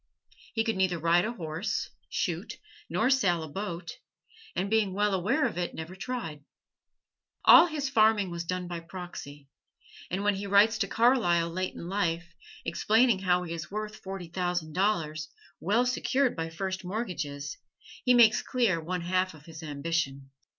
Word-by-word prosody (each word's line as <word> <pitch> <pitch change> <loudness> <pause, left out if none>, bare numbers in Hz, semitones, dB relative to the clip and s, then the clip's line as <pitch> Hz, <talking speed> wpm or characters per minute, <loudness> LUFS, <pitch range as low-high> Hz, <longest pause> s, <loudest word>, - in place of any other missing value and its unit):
He 225 - +2
could 225 -3 -1
neither 185 -2 +2
ride 170 +2 +3
a 230 - -2
horse, 165 -2 -3 0.2
shoot, - - -2 0.3
nor 260 - +2
sail 180 -11 +2
a - - -6
boat 175 +1 -5 0.6
and 190 - 0
being 210 -2 +2
well 205 0 +2
aware 220 - +1
of 220 -7 -2
it, 175 - -3
never 160 +3 -7
tried. 190 - -5 1.0
All 345 - +9
his 300 -4 -2
farming 220 -7 +3
was 170 0 -3
done 180 +1 -3
by 175 -1 -4
proxy; 165 -5 -9 0.6
and 190 +3 -2
when 205 0 +3
he 200 +1 -4
writes 210 +3 +5
to 200 - +1
Carlyle 195 -8 +3
late 185 +2 -3
in 170 - -7
life, 175 -3 -1 0.3
explaining 220 +5 +3
how 180 -1 +2
he 170 -1 -5
is 165 -2 -6
worth 215 +1 -5
forty 190 -2 -7
thousand 175 -2 -2
dollars, 160 -6 0 0.3
well 215 +8 +2
secured 255 +1 +1
by 165 -1 -3
first 190 +3 -4
mortgages, 155 -9 -4 0.4
he 250 -1 +5
makes 230 -3 +6
clear 225 -10 +1
one 180 +2 -3
half 185 0 0
of 155 0 -16
his 165 -1 -10
ambition. 145 -3 -3
185 Hz, 165 wpm, -29 LUFS, 165-215 Hz, 1.0 s, All